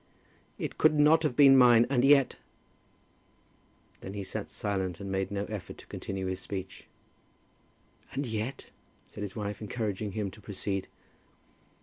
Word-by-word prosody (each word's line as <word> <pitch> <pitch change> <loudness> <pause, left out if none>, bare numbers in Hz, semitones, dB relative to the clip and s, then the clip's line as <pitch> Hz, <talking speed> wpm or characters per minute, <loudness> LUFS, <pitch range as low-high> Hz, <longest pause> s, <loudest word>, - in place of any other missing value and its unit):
"It - - -5
could 155 - +4
not 150 +2 +6
have 150 -6 0
been 135 -1 +8
mine, 120 -2 +7
and 125 -2 +1
yet 140 -1 +5 0.8
" - - -36
Then 95 +1 -7
he 100 - -4
sat - - -5
silent, 95 -4 -3
and 100 -1 -5
made 95 0 -1
no 100 0 -2
effort 105 -3 -7
to - - -14
continue 95 -1 -5
his 95 0 -3
speech. 95 0 -7 1.3
"And 140 - -2
yet?" 110 +3 -4 0.4
said - - -10
his 100 -2 -5
wife, 105 -1 -4
encouraging 105 -2 -3
him 105 -2 -2
to 105 - -15
proceed. 95 -1 -4
105 Hz, 150 wpm, -29 LUFS, 95-125 Hz, 1.3 s, been